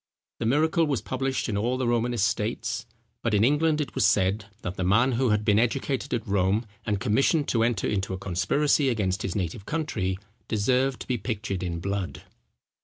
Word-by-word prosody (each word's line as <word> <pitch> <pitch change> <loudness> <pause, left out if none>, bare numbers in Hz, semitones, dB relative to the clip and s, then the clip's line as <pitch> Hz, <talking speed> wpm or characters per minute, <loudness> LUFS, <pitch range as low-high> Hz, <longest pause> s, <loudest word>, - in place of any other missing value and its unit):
The 115 - -1
miracle 160 +6 +3
was 140 -5 0
published 130 0 -2
in 110 - -2
all 120 +5 0
the 130 -2 -1
Romanist 120 -2 +1
states; 110 +2 -2 0.3
but 115 -2 +1
in 105 - +4
England, 150 +4 +3
it 150 - -3
was - - +1
said, 100 0 +2 0.2
that 90 - -4
the 95 - -2
man 110 +8 +4
who 125 +1 +1
had 105 0 +1
been 105 0 +4
educated 130 +3 -1
at 115 -3 -2
Rome, 100 +3 +1 0.2
and 105 -3 0
commissioned 135 - +2
to 115 - +2
enter 115 -3 0
into 95 -2 -1
a 95 - -2
conspiracy 135 - +1
against 100 -6 0
his 95 - -3
native 95 +1 -3
country, 110 - -1 0.3
deserved 125 +5 +1
to - - -7
be 125 -3 -1
pictured 100 -3 -3
in 85 -2 -3
blood. 100 0 -3
110 Hz, 190 wpm, -26 LUFS, 100-130 Hz, 0.3 s, in